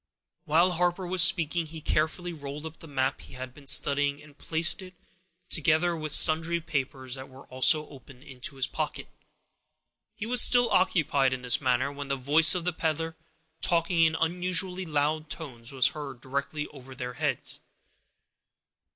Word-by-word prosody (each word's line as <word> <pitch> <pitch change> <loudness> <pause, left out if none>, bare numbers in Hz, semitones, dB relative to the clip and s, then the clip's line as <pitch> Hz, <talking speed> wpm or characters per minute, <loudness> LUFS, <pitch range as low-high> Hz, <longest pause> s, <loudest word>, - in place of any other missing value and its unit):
While 170 +4 +3
Harper 180 +2 -1
was 180 0 +2
speaking, 170 -2 +3
he 160 +1 -9
carefully 160 +3 -1
rolled 145 0 -8
up 160 0 -9
the 165 - -13
map 135 -1 -2
he - - -14
had 130 -1 -8
been 140 0 -17
studying, 140 +1 +3
and 150 -1 -17
placed 165 +5 -2
it, 185 -1 -12 0.5
together 165 +2 +1
with 155 -2 -4
sundry 165 +3 +5
papers 135 -5 -4
that 130 0 -7
were 130 +1 -15
also 150 +4 +3
open, 135 -2 -15
into 135 -1 -6
his 135 -2 -1
pocket. - - -5 1.1
He 205 - -6
was 245 +1 +5
still 245 -2 +5
occupied 145 -7 +2
in 130 -1 -6
this 125 -1 +3
manner, 130 +1 0
when 145 0 -7
the 140 - -1
voice 150 +6 +4
of 175 -2 -3
the 180 - -1
peddler, 160 0 -3 0.5
talking 170 0 +1
in 160 0 +3
unusually 180 +2 +1
loud 155 +1 -1
tones, 125 -8 -8
was 130 -2 +3
heard 140 -4 -8
directly 140 +3 -4
over 130 -2 -13
their 125 -2 -6
heads. - - -3
155 Hz, 165 wpm, -27 LUFS, 135-170 Hz, 1.1 s, sundry